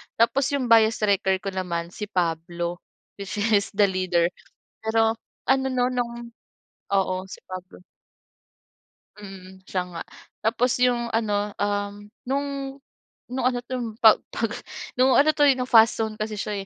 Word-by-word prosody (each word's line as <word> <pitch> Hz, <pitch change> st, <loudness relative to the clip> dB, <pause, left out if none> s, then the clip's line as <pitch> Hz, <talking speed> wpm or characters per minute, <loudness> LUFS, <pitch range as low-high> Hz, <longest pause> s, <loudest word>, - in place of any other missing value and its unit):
tapos 265 Hz, +4 st, +3 dB
yung 255 Hz, -4 st, -2 dB
bias 225 Hz, -1 st, +5 dB
wrecker 195 Hz, -2 st, +2 dB
ko 195 Hz, -, -3 dB
naman 170 Hz, -2 st, -3 dB
si 210 Hz, +3 st, -6 dB
Pablo, 175 Hz, -1 st, -2 dB, 0.4 s
which 200 Hz, -1 st, -5 dB
is 205 Hz, -1 st, +2 dB
the 205 Hz, -, +4 dB
leader, 185 Hz, -3 st, +1 dB, 0.5 s
pero 225 Hz, 0 st, +2 dB, 0.3 s
ano 265 Hz, 0 st, +3 dB
'no 250 Hz, -1 st, +2 dB
nung 235 Hz, -2 st, -4 dB, 0.6 s
oo 190 Hz, -2 st, +2 dB, 0.2 s
si -, -, -8 dB
Pablo 185 Hz, 0 st, -9 dB, 1.4 s
mm, 190 Hz, -1 st, -11 dB
siya 185 Hz, -, 0 dB
nga, 165 Hz, -, -5 dB, 0.4 s
tapos 235 Hz, +3 st, +1 dB
yung 245 Hz, -1 st, +3 dB
ano, 210 Hz, -2 st, 0 dB
um, 205 Hz, 0 st, -1 dB, 0.3 s
nung 280 Hz, +3 st, -1 dB, 0.8 s
nung 250 Hz, 0 st, -2 dB
ano 245 Hz, -1 st, -3 dB
to 245 Hz, -3 st, -4 dB
pag 220 Hz, -1 st, +9 dB, 0.2 s
pag 225 Hz, -, -1 dB, 0.5 s
nung 260 Hz, +1 st, +5 dB
ano 295 Hz, +2 st, +5 dB
'to, 295 Hz, -1 st, +4 dB
eh, 280 Hz, -, +6 dB
nung 250 Hz, 0 st, -3 dB
Fast 225 Hz, -1 st, +6 dB
Zone 220 Hz, -1 st, -3 dB
kasi 215 Hz, 0 st, -3 dB
siya, 200 Hz, -1 st, -3 dB
215 Hz, 150 wpm, -24 LUFS, 190-240 Hz, 1.4 s, pag